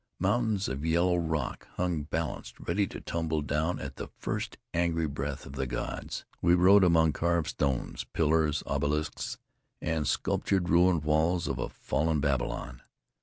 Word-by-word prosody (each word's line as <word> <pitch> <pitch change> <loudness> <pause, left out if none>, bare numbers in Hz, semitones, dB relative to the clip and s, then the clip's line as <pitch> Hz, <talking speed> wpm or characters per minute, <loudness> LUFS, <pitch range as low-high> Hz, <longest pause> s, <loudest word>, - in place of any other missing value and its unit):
Mountains 105 +1 +1
of 65 +2 -4
yellow 85 +2 +3
rock 80 -5 -2
hung 90 -4 0
balanced, 80 +2 -4
ready 100 +4 0
to - - -7
tumble 80 -2 -2
down 75 +4 0
at 70 0 -7
the - - -5
first - - -3 0.2
angry 85 -1 +1
breath 70 -1 -4
of 65 - -9
the 65 -1 -2
gods. - - -4 0.2
We 85 +1 +5
rode 95 +3 +7
among 80 -3 +4
carved 85 0 +1
stones, 70 -4 -1
pillars, 80 -1 +2
obelisks 75 +2 -1 0.4
and 80 -2 -1
sculptured 95 -3 0
ruined 85 -1 +4
walls 80 +3 +2
of 65 -2 -2
a - - -2
fallen 80 0 0
Babylon. 65 -3 -1
80 Hz, 150 wpm, -29 LUFS, 75-85 Hz, 0.4 s, rode